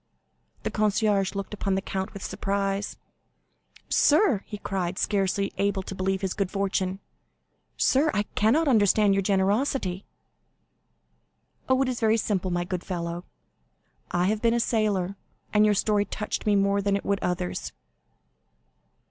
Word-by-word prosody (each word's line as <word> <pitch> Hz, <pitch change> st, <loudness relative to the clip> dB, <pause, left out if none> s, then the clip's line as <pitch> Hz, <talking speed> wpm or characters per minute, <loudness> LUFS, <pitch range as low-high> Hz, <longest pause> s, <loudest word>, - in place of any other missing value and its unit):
The -, -, -2 dB
concierge 210 Hz, -2 st, +1 dB
looked 200 Hz, +1 st, -4 dB
upon 195 Hz, -2 st, -1 dB
the -, -, +1 dB
count 190 Hz, -1 st, -3 dB
with 200 Hz, -, -9 dB
surprise. 195 Hz, +1 st, -2 dB, 0.9 s
"Sir," 295 Hz, -, +4 dB
he 210 Hz, -, -6 dB
cried, 185 Hz, -3 st, -3 dB
scarcely 195 Hz, -1 st, 0 dB
able 200 Hz, -1 st, +1 dB
to 195 Hz, -, -7 dB
believe 190 Hz, +1 st, -1 dB
his 190 Hz, -2 st, -1 dB
good 195 Hz, -2 st, -1 dB
fortune—"sir, 195 Hz, +8 st, -2 dB
I 205 Hz, -, 0 dB
cannot 275 Hz, +10 st, +3 dB
understand 210 Hz, -4 st, +4 dB
your 195 Hz, -, +2 dB
generosity!" 195 Hz, +1 st, 0 dB, 1.7 s
"Oh, 260 Hz, 0 st, +4 dB
it -, -, -2 dB
is 255 Hz, -2 st, -2 dB
very 220 Hz, 0 st, +3 dB
simple, 195 Hz, -4 st, -1 dB
my 175 Hz, 0 st, 0 dB
good 180 Hz, 0 st, -4 dB
fellow; 170 Hz, -1 st, -4 dB, 0.8 s
I 175 Hz, 0 st, +1 dB
have 210 Hz, +2 st, 0 dB
been 230 Hz, 0 st, +3 dB
a -, -, +2 dB
sailor, 205 Hz, -5 st, 0 dB, 0.4 s
and 210 Hz, 0 st, +5 dB
your 210 Hz, -1 st, +3 dB
story 205 Hz, 0 st, +2 dB
touched 210 Hz, +2 st, -4 dB
me 205 Hz, -, +4 dB
more 200 Hz, 0 st, +2 dB
than 200 Hz, 0 st, +1 dB
it 200 Hz, -, -3 dB
would 200 Hz, -1 st, +1 dB
others." 180 Hz, 0 st, -3 dB
200 Hz, 145 wpm, -26 LUFS, 190-210 Hz, 1.7 s, and